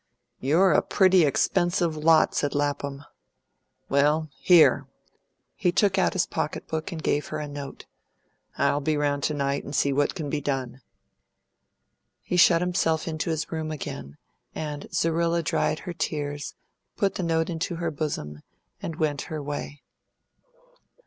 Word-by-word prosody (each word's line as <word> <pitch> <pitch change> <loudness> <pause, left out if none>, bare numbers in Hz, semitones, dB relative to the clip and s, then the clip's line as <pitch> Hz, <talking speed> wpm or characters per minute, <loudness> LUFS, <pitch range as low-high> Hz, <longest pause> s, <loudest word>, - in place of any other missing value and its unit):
"You're 170 +8 +3
a - - +4
pretty 185 -3 +4
expensive 175 +3 +1
lot," 155 +1 +4
said 145 -1 -1
Lapham. 145 -1 -2 0.8
"Well, 150 +3 +2
here!" 175 -3 +5 0.7
He 180 -4 +1
took 195 +1 +2
out - - +2
his 185 - +1
pocket 150 - -4
book 160 +3 -3
and 160 -3 -6
gave 145 - 0
her 155 - -4
a 150 -1 -4
note. 145 -1 -8 0.7
"I'll 145 +1 +2
be 155 +1 0
round 145 -1 0
to 155 - 0
night 140 0 -1
and 140 - -6
see 140 - +2
what 145 +1 +1
can 160 -5 -4
be 145 +1 -2
done." 135 -2 -3 1.4
He - - -3
shut 175 -1 +6
himself 175 -3 0
into 160 0 -2
his 160 0 -2
room 160 -1 -3
again, 75 - -6 0.4
and 150 -2 -5
Zerrilla 165 +1 +1
dried 155 - 0
her 180 - -6
tears, 145 -3 -3 0.4
put 200 -1 +1
the - - -4
note 165 0 0
into 170 +1 -3
her 165 -1 -2
bosom, 105 - -4 0.4
and 165 - -4
went 150 -3 -1
her 155 - -4
way. 145 0 -6
155 Hz, 150 wpm, -26 LUFS, 145-170 Hz, 1.4 s, shut